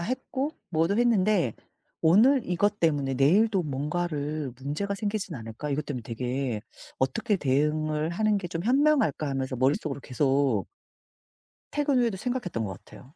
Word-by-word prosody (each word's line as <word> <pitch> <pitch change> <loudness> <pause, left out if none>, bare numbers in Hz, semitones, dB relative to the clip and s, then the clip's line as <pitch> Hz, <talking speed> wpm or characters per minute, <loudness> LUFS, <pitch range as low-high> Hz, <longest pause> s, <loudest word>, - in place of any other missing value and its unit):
했고 260 - -2 0.2
뭐도 165 +6 +1
했는데 205 - +3 0.5
'오늘 225 - +5
이것 205 +4 0
때문에 145 -5 +1
내일도 190 - +3
뭔가를 150 -1 -2
문제가 150 +9 -2
생기진 200 -3 -3
않을까.' 115 +5 -6
이것 145 +1 -2
때문에 125 -5 -4
되게 125 0 -3 0.4
'어떻게 200 +10 +1
대응을 150 +2 0
하는 210 +4 +1
게 180 -3 -4
좀 165 0 -4
현명할까.' 270 - +3
하면서 130 -1 -2
머릿속으로 140 +2 0
계속 135 - +1 1.0
퇴근 290 -3 +1
후에도 235 -5 +1
생각했던 190 - -3
것 95 -2 -7
같아요. - - -14
155 Hz, 335 characters per minute, -27 LUFS, 135-205 Hz, 1.0 s, 오늘